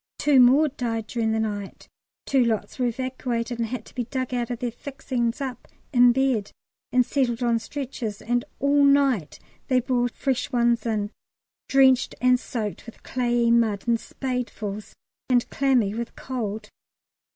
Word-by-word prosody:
Two 290 Hz, -3 st, +4 dB
more 265 Hz, +5 st, +6 dB
died 235 Hz, -5 st, -3 dB
during 225 Hz, 0 st, -1 dB
the 220 Hz, -, 0 dB
night, 205 Hz, -3 st, -4 dB, 0.4 s
two 270 Hz, -2 st, +3 dB
lots 230 Hz, +2 st, -2 dB
were 250 Hz, -, +2 dB
evacuated, 240 Hz, -1 st, -3 dB
and 230 Hz, -, 0 dB
had 230 Hz, -1 st, -5 dB
to -, -, -16 dB
be 245 Hz, -2 st, -3 dB
dug 255 Hz, +1 st, -3 dB
out 240 Hz, -1 st, -1 dB
of 245 Hz, -, -3 dB
their 240 Hz, 0 st, -3 dB
fixings 250 Hz, -1 st, -3 dB
up 260 Hz, -4 st, -5 dB, 0.3 s
in 245 Hz, -1 st, +7 dB
bed 250 Hz, -5 st, 0 dB, 0.4 s
and 250 Hz, -1 st, +4 dB
settled 245 Hz, -2 st, 0 dB
on 235 Hz, -1 st, +2 dB
stretchers, 235 Hz, -4 st, -5 dB
and 240 Hz, +1 st, 0 dB, 0.2 s
all 285 Hz, +1 st, +3 dB
night 275 Hz, -, +3 dB, 0.3 s
they 255 Hz, -2 st, +3 dB
brought 245 Hz, -1 st, -1 dB
fresh 265 Hz, 0 st, -1 dB
ones 235 Hz, -2 st, +2 dB
in, 210 Hz, -2 st, -1 dB, 0.6 s
drenched 265 Hz, -2 st, +4 dB
and 250 Hz, 0 st, +4 dB
soaked 220 Hz, -3 st, -5 dB
with 230 Hz, -, -12 dB
clayey 240 Hz, -2 st, +1 dB
mud 225 Hz, -3 st, +2 dB
in 235 Hz, -, +4 dB
spadefuls, 230 Hz, -5 st, -5 dB, 0.3 s
and 245 Hz, -2 st, +3 dB
clammy 255 Hz, -7 st, +2 dB
with 235 Hz, +1 st, -5 dB
cold. 220 Hz, -4 st, -5 dB
245 Hz, 160 wpm, -25 LUFS, 230-260 Hz, 0.6 s, in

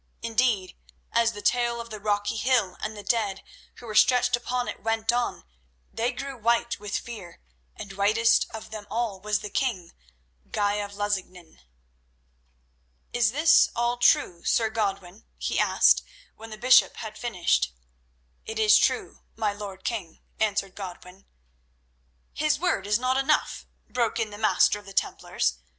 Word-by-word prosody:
Indeed, 225 Hz, -5 st, +1 dB, 0.4 s
as 230 Hz, 0 st, +2 dB
the 205 Hz, -, -9 dB
tale 240 Hz, +1 st, +1 dB
of 235 Hz, -1 st, -8 dB
the 215 Hz, -, -6 dB
rocky 205 Hz, 0 st, -1 dB
hill 225 Hz, -5 st, +1 dB
and 215 Hz, 0 st, -4 dB
the 205 Hz, -, -8 dB
dead 205 Hz, -5 st, -1 dB, 0.3 s
who -, -, -13 dB
were 220 Hz, -, -6 dB
stretched 245 Hz, +3 st, +4 dB
upon 245 Hz, +1 st, -3 dB
it -, -, -6 dB
went 225 Hz, 0 st, 0 dB
on, 245 Hz, -, -1 dB, 0.5 s
they 235 Hz, +2 st, 0 dB
grew 275 Hz, +2 st, -6 dB
white 235 Hz, 0 st, 0 dB
with 205 Hz, 0 st, -3 dB
fear, 200 Hz, -8 st, -9 dB, 0.4 s
and 200 Hz, -, -8 dB
whitest 215 Hz, +4 st, +3 dB
of 220 Hz, -, -9 dB
them 215 Hz, -2 st, -8 dB
all 225 Hz, -4 st, -2 dB
was 210 Hz, +1 st, -1 dB
the 210 Hz, -, -6 dB
king, 195 Hz, -11 st, -2 dB, 0.6 s
Guy 205 Hz, -1 st, 0 dB
of 205 Hz, -1 st, -5 dB
Lusignan. 190 Hz, -4 st, -4 dB, 1.5 s
"Is 255 Hz, +8 st, +4 dB
all 240 Hz, 0 st, +1 dB
this 245 Hz, -, +6 dB
true, 170 Hz, -1 st, 0 dB
Sir 225 Hz, -1 st, +1 dB
Godwin?" 195 Hz, -2 st, -3 dB
he -, -, -1 dB
asked, -, -, +4 dB, 0.3 s
when 225 Hz, +1 st, -11 dB
the 215 Hz, -, -8 dB
bishop 255 Hz, +3 st, +5 dB
had 220 Hz, -2 st, -7 dB
finished. 175 Hz, -, 0 dB, 0.8 s
"It 220 Hz, -, -5 dB
is 215 Hz, -1 st, +6 dB
true, -, -, 0 dB, 0.2 s
my 215 Hz, -2 st, -1 dB
lord 200 Hz, -2 st, -8 dB
king," 200 Hz, -9 st, -4 dB, 0.2 s
answered 200 Hz, -3 st, 0 dB
Godwin. 185 Hz, -1 st, -10 dB, 1.1 s
"His 305 Hz, 0 st, +1 dB
word 285 Hz, -, -1 dB
is 210 Hz, 0 st, +3 dB
not 255 Hz, +2 st, 0 dB
enough," 270 Hz, +3 st, 0 dB, 0.2 s
broke 235 Hz, -1 st, -1 dB
in 220 Hz, -2 st, -1 dB
the 205 Hz, -, -9 dB
Master 215 Hz, -1 st, +3 dB
of 205 Hz, -, -17 dB
the 195 Hz, -, -10 dB
Templars. -, -, -1 dB
215 Hz, 155 wpm, -26 LUFS, 200-235 Hz, 1.5 s, this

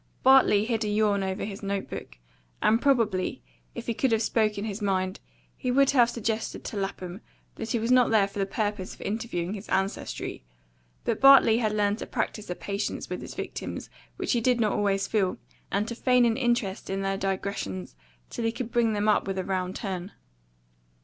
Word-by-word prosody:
Bartley 255 Hz, -6 st, +6 dB
hid 225 Hz, -1 st, 0 dB
a -, -, -2 dB
yawn 210 Hz, -1 st, +2 dB
over 190 Hz, +1 st, -2 dB
his 200 Hz, -1 st, -7 dB
note 200 Hz, -1 st, -2 dB
book, -, -, -8 dB, 0.4 s
and 225 Hz, +2 st, +3 dB
probably, 225 Hz, -, +1 dB, 0.3 s
if -, -, -6 dB
he 235 Hz, -, -1 dB
could 260 Hz, +2 st, +1 dB
have 225 Hz, 0 st, +2 dB
spoken 215 Hz, -2 st, +1 dB
his 210 Hz, 0 st, -4 dB
mind, 190 Hz, -1 st, 0 dB, 0.4 s
he 255 Hz, -, -3 dB
would 275 Hz, +2 st, +4 dB
have 245 Hz, -4 st, +5 dB
suggested 225 Hz, -1 st, -3 dB
to -, -, -6 dB
Lapham 195 Hz, 0 st, -4 dB, 0.3 s
that 225 Hz, -, -6 dB
he -, -, +2 dB
was 230 Hz, +2 st, -1 dB
not 255 Hz, -1 st, +5 dB
there 215 Hz, -3 st, +4 dB
for 200 Hz, -, -7 dB
the 195 Hz, -, +1 dB
purpose 205 Hz, -2 st, -2 dB
of -, -, -16 dB
interviewing 200 Hz, -4 st, -3 dB
his 210 Hz, 0 st, -8 dB
ancestry. 195 Hz, -, -2 dB, 0.6 s
But -, -, -1 dB
Bartley 270 Hz, -4 st, +8 dB
had 215 Hz, -3 st, 0 dB
learned 205 Hz, 0 st, +1 dB
to -, -, -6 dB
practise 215 Hz, -3 st, -3 dB
a 180 Hz, -, -2 dB
patience 200 Hz, +3 st, -4 dB
with -, -, -3 dB
his -, -, -8 dB
victims -, -, -5 dB, 0.3 s
which -, -, -2 dB
he 240 Hz, -, +2 dB
did 245 Hz, 0 st, +2 dB
not 215 Hz, -2 st, +2 dB
always 195 Hz, -1 st, +1 dB
feel, 195 Hz, -4 st, 0 dB, 0.3 s
and 205 Hz, +2 st, 0 dB
to 235 Hz, -, -3 dB
feign 250 Hz, +1 st, +3 dB
an 230 Hz, -1 st, +2 dB
interest 240 Hz, -6 st, -1 dB
in 195 Hz, 0 st, -1 dB
their 195 Hz, 0 st, 0 dB
digressions 190 Hz, -, -3 dB, 0.4 s
till 235 Hz, -, -3 dB
he 225 Hz, -, +2 dB
could 235 Hz, 0 st, -5 dB
bring 235 Hz, -2 st, +2 dB
them 205 Hz, 0 st, 0 dB
up 210 Hz, -2 st, +3 dB
with 195 Hz, 0 st, -2 dB
a 185 Hz, -, -1 dB
round 185 Hz, 0 st, -2 dB
turn. 190 Hz, -2 st, -4 dB
210 Hz, 200 wpm, -27 LUFS, 195-230 Hz, 0.6 s, Bartley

